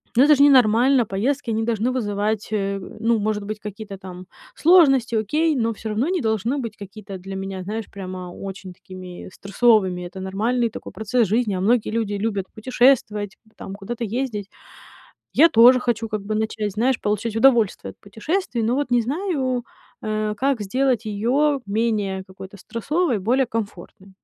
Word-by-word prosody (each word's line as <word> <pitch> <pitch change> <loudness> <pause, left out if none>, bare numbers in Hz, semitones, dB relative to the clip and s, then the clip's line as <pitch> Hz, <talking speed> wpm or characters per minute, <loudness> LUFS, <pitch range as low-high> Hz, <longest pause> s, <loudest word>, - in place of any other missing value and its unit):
ну 250 - +6
это 300 +1 +6
ж - - -6
ненормально- 255 -1 +5
поездки 230 +6 -1
они 220 0 0
должны 230 +1 0
вызывать, 210 -3 -2
э, 200 -1 -1 0.2
ну, 230 0 +2
может 210 0 -1
быть, 215 +1 -5
какие-то 210 -1 -8
там 185 -1 -10 0.3
сложности, 270 -9 +5
окей, 300 +9 +1
но 230 -3 +1
всё 220 +1 -7
равно 220 +7 0
не 365 -4 0
должны 225 +5 -1
быть 230 -3 -6
какие-то 200 0 -9
для 195 +1 -8
меня, 195 -1 -5
знаешь, 215 +3 -4
прямо 185 -2 -7
очень 195 -1 -8
такими 185 0 -10
стрессовыми. 200 -3 +2
Это 190 +2 -10
нормальный 235 +4 0
такой - - -9
процесс 220 +1 0
жизни, 220 +1 +1
а - - -2
многие 225 +3 +2
люди 220 -2 -1
любят 200 -2 -2
путешествовать, 220 -4 +1 0.2
там, 195 - -8
куда-то 225 +4 -6
ездить. 220 -2 -3 0.9
Я 330 +3 +6
тоже 245 +2 +7
хочу 235 -2 -1
как 215 -1 -3
бы 210 +2 -3
начать, 215 -1 -2
знаешь, 240 +4 +1
получать 210 +2 -1
удовольствие 230 -4 +3
от - - -24
путешествий, 235 - -3
но 235 +3 +1
вот 280 -2 -2
не 245 -1 +4
знаю, 265 - -2 0.4
э, 215 -1 -2
как 270 -1 0
сделать 250 +3 0
ее 255 +8 +1
менее 205 -2 -1
какой-то 190 +1 -11
стрессовой, 255 - -1
более 250 +7 +2
комфортной. 200 -4 -6
220 Hz, 165 wpm, -22 LUFS, 200-250 Hz, 0.9 s, тоже